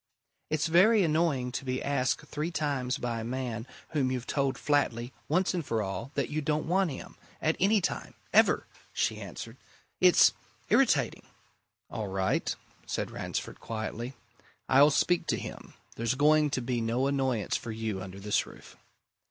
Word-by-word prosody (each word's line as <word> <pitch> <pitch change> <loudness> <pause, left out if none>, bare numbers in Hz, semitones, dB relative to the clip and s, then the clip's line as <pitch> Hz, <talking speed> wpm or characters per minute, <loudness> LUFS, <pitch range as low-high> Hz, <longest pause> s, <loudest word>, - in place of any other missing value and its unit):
"It's 155 0 +1
very 190 +6 +5
annoying 155 -6 +1
to 130 - -4
be 130 -1 -2
asked 140 +1 0
three 150 +2 -3
times 140 -5 -1
by 120 -3 -2
a - - -4
man 120 -1 -3 0.2
whom 140 -5 0
you've 125 -1 -3
told 135 -2 0
flatly, 130 -4 0 0.2
once 180 +5 +2
for 115 -7 -1
all, 100 +6 -4
that 140 -3 0
you 155 +1 -1
don't 150 0 0
want 185 +1 +2
him, 135 - -8 0.2
at 155 +1 +1
any 205 +2 +4
time, - - -3 0.2
ever!" - - +5 0.3
she - - 0
answered. - - -8 0.4
"It's - - +6 0.4
irritating!" - - +2 0.6
"All 110 -2 -3
right," 95 0 0 0.3
said - - -2
Ransford - - -4
quietly. 115 +3 -5 0.5
"I'll 140 +3 +7
speak 170 +4 +2
to - - +1
him. - - -8 0.2
There's 115 +2 0
going 150 +2 +4
to 130 -3 -2
be 120 -1 -1
no 115 +4 0
annoyance 130 -6 0
for 115 - -4
you 110 -3 -3
under 95 +1 -8
this 105 +1 0
roof." - - -14
130 Hz, 160 wpm, -29 LUFS, 115-150 Hz, 0.6 s, I'll